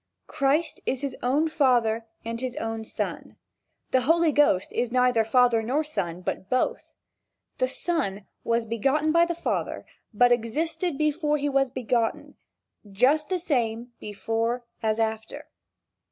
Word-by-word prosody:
Christ 300 Hz, +3 st, 0 dB
is 260 Hz, 0 st, -1 dB
his 275 Hz, -3 st, -3 dB
own 280 Hz, +6 st, +2 dB
father 240 Hz, -7 st, +2 dB, 0.2 s
and 230 Hz, +1 st, -4 dB
his 255 Hz, -1 st, -3 dB
own 225 Hz, 0 st, -3 dB
son. -, -, -5 dB, 0.6 s
The 260 Hz, -, +3 dB
Holy 325 Hz, +4 st, +3 dB
Ghost 285 Hz, -11 st, +2 dB
is 240 Hz, -1 st, -1 dB
neither 250 Hz, -2 st, +3 dB
father 240 Hz, 0 st, +3 dB
nor 265 Hz, +8 st, 0 dB
son, 180 Hz, -, -4 dB
but 185 Hz, +1 st, -4 dB
both. 255 Hz, -, 0 dB, 0.7 s
The -, -, +2 dB
son 235 Hz, -, -2 dB, 0.2 s
was 230 Hz, 0 st, 0 dB
begotten 270 Hz, +8 st, +1 dB
by 335 Hz, +1 st, +5 dB
the 340 Hz, 0 st, -3 dB
father, 340 Hz, -, -3 dB, 0.3 s
but 245 Hz, +3 st, +4 dB
existed 295 Hz, +8 st, -1 dB
before 300 Hz, 0 st, +1 dB
he 290 Hz, 0 st, -1 dB
was 270 Hz, -1 st, +2 dB
begotten 240 Hz, -2 st, -1 dB, 0.6 s
just 275 Hz, +9 st, +2 dB
the 370 Hz, -, +1 dB
same 240 Hz, -8 st, -1 dB
before 225 Hz, +4 st, -2 dB, 0.2 s
as 220 Hz, -1 st, 0 dB
after. 225 Hz, +7 st, -3 dB
250 Hz, 140 wpm, -26 LUFS, 225-300 Hz, 0.7 s, by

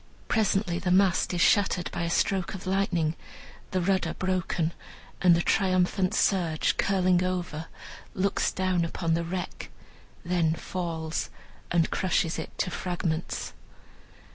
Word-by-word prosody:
Presently 195 Hz, -4 st, +1 dB
the 180 Hz, 0 st, -2 dB
mast 185 Hz, 0 st, +3 dB
is 175 Hz, -1 st, -1 dB
shattered 190 Hz, -3 st, +3 dB
by -, -, -3 dB
a 170 Hz, -, -1 dB
stroke 190 Hz, +2 st, 0 dB
of 190 Hz, -, -8 dB
lightning, 180 Hz, -4 st, +1 dB, 0.5 s
the 185 Hz, -, 0 dB
rudder 190 Hz, +1 st, +1 dB
broken, 180 Hz, -3 st, -1 dB, 0.5 s
and 180 Hz, -2 st, +6 dB
the 170 Hz, -, +1 dB
triumphant 185 Hz, -1 st, +2 dB
surge 170 Hz, -6 st, +2 dB
curling 185 Hz, -2 st, +2 dB
over 175 Hz, -4 st, -3 dB, 0.5 s
looks 195 Hz, +1 st, +1 dB
down 185 Hz, -2 st, 0 dB
upon, 165 Hz, 0 st, -1 dB
the 170 Hz, +1 st, +1 dB
wreck, 180 Hz, +1 st, -5 dB, 0.6 s
then 170 Hz, -2 st, +1 dB
falls, 165 Hz, -3 st, -3 dB, 0.4 s
and 170 Hz, -2 st, +2 dB
crushes 180 Hz, -3 st, 0 dB
it -, -, -5 dB
to 180 Hz, -, -1 dB
fragments. 175 Hz, -3 st, -3 dB
180 Hz, 130 wpm, -27 LUFS, 170-185 Hz, 0.6 s, and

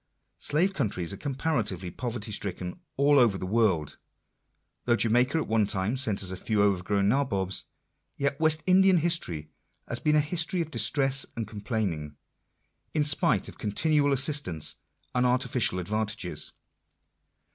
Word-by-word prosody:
Slave 175 Hz, +7 st, +1 dB
countries 100 Hz, -, -2 dB
are -, -, -7 dB
comparatively 120 Hz, -, -2 dB
poverty 115 Hz, -2 st, -5 dB
stricken 90 Hz, -3 st, -4 dB, 0.2 s
all 140 Hz, +1 st, +4 dB
over 115 Hz, -6 st, +3 dB
the 95 Hz, -, -5 dB
world. 90 Hz, -9 st, +1 dB, 0.9 s
Though 120 Hz, -, +3 dB
Jamaica 120 Hz, +6 st, +2 dB
at 160 Hz, -, -2 dB
one 110 Hz, -2 st, +2 dB
time 100 Hz, +4 st, 0 dB
sent 110 Hz, -8 st, -1 dB
us 95 Hz, -, 0 dB
a 95 Hz, -, -5 dB
few 105 Hz, +2 st, 0 dB
overgrown 100 Hz, 0 st, +1 dB
nabobs, 100 Hz, -7 st, 0 dB, 0.5 s
yet 140 Hz, 0 st, -1 dB
West 160 Hz, 0 st, +2 dB
Indian 190 Hz, 0 st, +5 dB
history 120 Hz, -, -1 dB, 0.4 s
has -, -, -3 dB
been 150 Hz, 0 st, +2 dB
a -, -, +5 dB
history 170 Hz, +4 st, 0 dB
of 160 Hz, -1 st, -5 dB
distress 135 Hz, +4 st, +2 dB
and 115 Hz, -, -3 dB
complainings, 100 Hz, -, -3 dB, 0.8 s
in 150 Hz, -, +3 dB
spite 140 Hz, -7 st, +2 dB
of -, -, -12 dB
continual 145 Hz, +7 st, +1 dB
assistance 135 Hz, -, +2 dB, 0.4 s
and 125 Hz, -, +1 dB
artificial 125 Hz, -5 st, +1 dB
advantages. 105 Hz, -4 st, -3 dB
115 Hz, 140 wpm, -27 LUFS, 100-145 Hz, 0.9 s, Indian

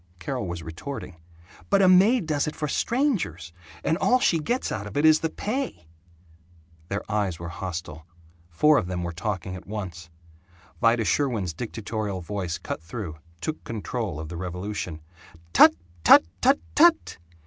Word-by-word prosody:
Carol 110 Hz, +4 st, -4 dB
was 85 Hz, -1 st, -5 dB
retorting, 85 Hz, -, -7 dB, 0.5 s
"But 200 Hz, -1 st, +4 dB
a -, -, +6 dB
maid 195 Hz, +4 st, +5 dB
does 150 Hz, -2 st, 0 dB
it 150 Hz, -, -4 dB
for 150 Hz, -, -2 dB
strangers, 165 Hz, -, -1 dB, 0.3 s
and 160 Hz, -, +1 dB
all 255 Hz, +4 st, +4 dB
she 170 Hz, -8 st, +3 dB
gets 240 Hz, -, -1 dB
out 105 Hz, 0 st, -4 dB
of 105 Hz, -, -6 dB
it 145 Hz, -, +3 dB
is 155 Hz, 0 st, +7 dB
the 160 Hz, -, -1 dB
pay 215 Hz, -, -4 dB, 0.5 s
" 80 Hz, -1 st, -30 dB
Their 100 Hz, +1 st, -2 dB
eyes 100 Hz, -5 st, -1 dB
were 85 Hz, +1 st, -6 dB
hostile. 90 Hz, -3 st, -6 dB, 0.4 s
Four 150 Hz, -, +4 dB
of 100 Hz, -, -4 dB
them 90 Hz, -1 st, -3 dB
were 85 Hz, -, -3 dB
talking 95 Hz, 0 st, -4 dB
at 95 Hz, -, -11 dB
once. 90 Hz, -5 st, -6 dB, 0.7 s
Vida 115 Hz, -1 st, +3 dB
Sherwin's 110 Hz, -, 0 dB
dictatorial 110 Hz, -1 st, -4 dB
voice 90 Hz, -1 st, -3 dB
cut -, -, -5 dB
through, 85 Hz, -2 st, -7 dB, 0.2 s
took 155 Hz, -, -4 dB
control 110 Hz, -6 st, -4 dB
of 80 Hz, -1 st, -6 dB
the 85 Hz, -, -6 dB
revolution: 90 Hz, -2 st, -5 dB, 0.5 s
"Tut, -, -, +8 dB, 0.3 s
tut, -, -, +9 dB, 0.2 s
tut, 270 Hz, +2 st, +5 dB, 0.2 s
tut! 330 Hz, -, +4 dB
100 Hz, 160 wpm, -25 LUFS, -, 0.7 s, tut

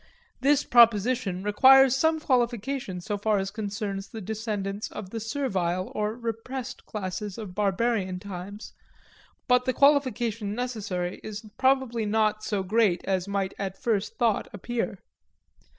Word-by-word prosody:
This 285 Hz, +1 st, +3 dB
proposition 230 Hz, -4 st, +4 dB
requires 265 Hz, +5 st, +6 dB
some 320 Hz, +3 st, +2 dB
qualification 240 Hz, -, -1 dB
so 205 Hz, +2 st, -3 dB
far 215 Hz, 0 st, +2 dB
as 195 Hz, 0 st, -2 dB
concerns 200 Hz, -2 st, -4 dB
the 225 Hz, -, -8 dB
descendants 210 Hz, -1 st, -4 dB
of 195 Hz, -3 st, -8 dB
the 230 Hz, -, -4 dB
servile 195 Hz, -8 st, -2 dB
or 210 Hz, +1 st, -1 dB
repressed 235 Hz, +2 st, -5 dB
classes 195 Hz, -1 st, -4 dB
of 210 Hz, -5 st, -7 dB
barbarian 200 Hz, -1 st, 0 dB
times, 200 Hz, +2 st, -8 dB, 0.7 s
but 250 Hz, 0 st, +4 dB
the 255 Hz, -, +1 dB
qualification 240 Hz, -7 st, +2 dB
necessary 205 Hz, -7 st, -3 dB
is 215 Hz, 0 st, -7 dB
probably 260 Hz, -4 st, +1 dB
not 215 Hz, 0 st, +1 dB
so 210 Hz, -3 st, -1 dB
great 195 Hz, -3 st, +2 dB
as 190 Hz, -1 st, 0 dB
might 200 Hz, -1 st, -1 dB
at 195 Hz, -1 st, -4 dB
first 215 Hz, -3 st, -1 dB
thought 230 Hz, -5 st, +1 dB
appear. 205 Hz, -1 st, -3 dB
215 Hz, 135 wpm, -27 LUFS, 195-240 Hz, 0.7 s, requires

